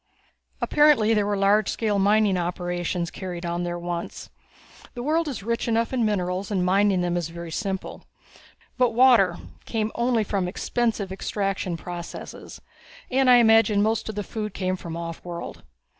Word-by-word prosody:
"Apparently 295 -8 +4
there 210 -2 +1
were 205 -1 0
large 200 +2 +3
scale 210 -3 0
mining 205 0 +3
operations 175 -1 -2
carried 180 -2 -6
on 170 0 -2
there 175 0 -3
once; 175 0 -5 0.6
the 240 - -5
world 320 +3 +1
is 260 -8 -5
rich 230 +2 -2
enough 230 +2 0
in 250 -2 +1
minerals 190 -2 -1
and 190 -4 0
mining 195 0 +3
them 175 0 -1
is 170 -2 -2
very 170 0 -8
simple. 190 +2 -4 0.7
But 245 -3 +2
water 230 -9 +5 0.3
came 220 -1 -2
only 235 -1 +1
from 195 -3 -1
expensive 215 +1 -1
extraction 195 -2 -2
processes 175 0 -8 0.5
and 265 0 +3
I 250 - +9
imagine 225 -3 +5
most 220 0 0
of 215 - -5
the 205 - -2
food 210 0 -5
came 185 -1 -1
from 170 -3 -7
offworld. 170 +1 -7
200 Hz, 160 wpm, -24 LUFS, 175-225 Hz, 0.7 s, I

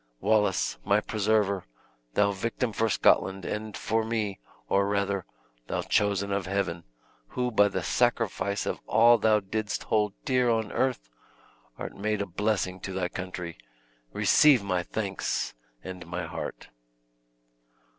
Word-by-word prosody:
"Wallace, 105 -3 +1
my 100 +1 +3
preserver; 105 -2 +1 0.5
thou 100 0 +4
victim 115 +4 -2
for 115 +1 +1
Scotland, 95 -2 +3
and 105 0 -4
for 110 +1 0
me 110 -3 -2 0.3
or 100 0 +2
rather, 100 -3 -1 0.4
thou - - -2
chosen 100 -1 +1
of 100 -2 -1
Heaven; 95 -4 -2 0.4
who, 125 - -2
by 105 -2 +5
the - - -3
sacrifice 100 0 0
of - - -2
all 115 +2 +6
thou 110 -1 +4
didst 105 +1 -3
hold 105 -2 +1
dear 125 -2 +2
on 110 -2 0
earth, 130 - 0 0.7
art - - -6
made 105 +1 -1
a 100 - -1
blessing 95 -1 -1
to 95 +1 -6
thy 90 -1 -1
country! 90 -2 -6 0.5
receive 140 - +5
my 90 -3 0
thanks, 100 +1 -2 0.3
and 90 -2 -8
my 90 +1 -4
heart." 80 0 -6
100 Hz, 135 wpm, -28 LUFS, 95-110 Hz, 0.7 s, all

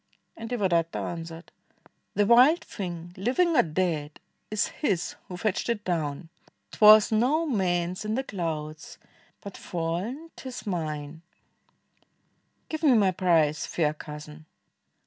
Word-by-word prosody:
And 225 0 -7
Devadatta 180 -8 0
answered, 165 0 -6 0.6
"The 205 - +3
wild 255 +10 +6
thing, 175 -3 -7
Living 290 - +1
or 245 - +7
dead, 155 -3 -2 0.3
is 215 -1 0
his 195 - -2
who 180 - -7
fetched 215 +4 -1
it 220 -3 -1
down; 160 -2 -2 0.4
'T - - -12
was 215 0 +8
no 260 +9 +2
man's 180 - -1
in 215 +1 -2
the 265 - -1
clouds, 160 - -5 0.4
but 200 - -8
fall'n 185 - -4
't - - -10
is 250 - -8
mine, 155 -4 -4 1.5
Give 315 -1 -5
me 295 -5 +5
my 200 -4 +4
prize, 165 -5 +2
fair 155 -3 0
Cousin." 150 0 -10
180 Hz, 130 wpm, -27 LUFS, 165-225 Hz, 1.5 s, was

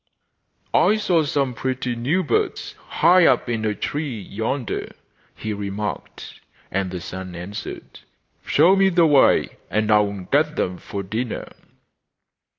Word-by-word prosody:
'I 215 - +4
saw 180 -6 +2
some 140 -3 0
pretty 130 0 -2
new 145 +11 0
birds, 150 - -1
high 180 -1 +5
up - - +2
in 115 -2 -2
a 105 -1 0
tree 145 -4 -3
yonder,' 115 +5 -4 0.4
he 110 - -4
remarked. 100 +1 -5 0.3
And 95 0 -1
the 90 0 -5
son 95 +1 -7
answered: 90 +4 -8 0.4
'Show 170 +6 +4
me 195 0 +4
the 170 -2 +4
way 145 -3 +4
and 110 0 0
I 105 - +6
will 100 -2 -1
get 150 - +1
them 90 -1 -2
for 100 -1 -6
dinner. 110 +5 -4
115 Hz, 140 wpm, -22 LUFS, 100-150 Hz, 0.4 s, I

